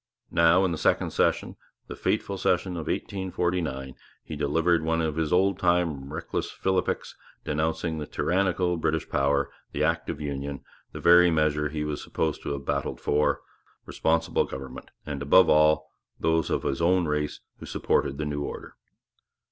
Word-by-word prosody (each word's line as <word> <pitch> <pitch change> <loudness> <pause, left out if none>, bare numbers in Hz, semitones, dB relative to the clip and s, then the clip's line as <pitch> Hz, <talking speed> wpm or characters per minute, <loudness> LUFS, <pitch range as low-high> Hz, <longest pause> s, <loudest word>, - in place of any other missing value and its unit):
Now, 85 +3 +5
in 90 - 0
the 80 - -3
second - - +1
session, - - 0 0.3
the - - -8
fateful - - -1
session 95 - +1
of 85 -4 -5
1849, 85 -8 -2 0.3
he 75 - -7
delivered 80 +4 +2
one 80 +1 +1
of 80 -2 -1
his 80 -2 -1
old 95 +1 +3
time 85 -6 +1
reckless 80 +2 -3
philippics 95 -1 -1 0.3
denouncing 80 +1 -1
the 75 - -5
tyrannical 90 -1 0
British 80 -1 -1
power, 70 0 +1 0.2
the - - 0
Act - - 0
of - - -4
Union 70 -1 -4 0.3
the - - -7
very 85 +1 +6
measure 75 -2 +1
he 75 0 -3
was 75 -1 -3
supposed 80 -1 -2
to - - -5
have 70 -1 -6
battled 70 -1 -2
for 75 +1 +1 0.4
responsible 80 0 +1
government, 65 -1 -8 0.2
and, 70 -2 -5
above 80 +6 +5
all, 75 0 +4 0.3
those 80 0 +1
of - - 0
his 70 - -1
own 90 +1 +3
race 75 -1 -2 0.2
who - - -9
supported 70 - 0
the 75 - -2
new 75 -1 -3
order. - - -6
80 Hz, 165 wpm, -26 LUFS, 75-85 Hz, 0.4 s, very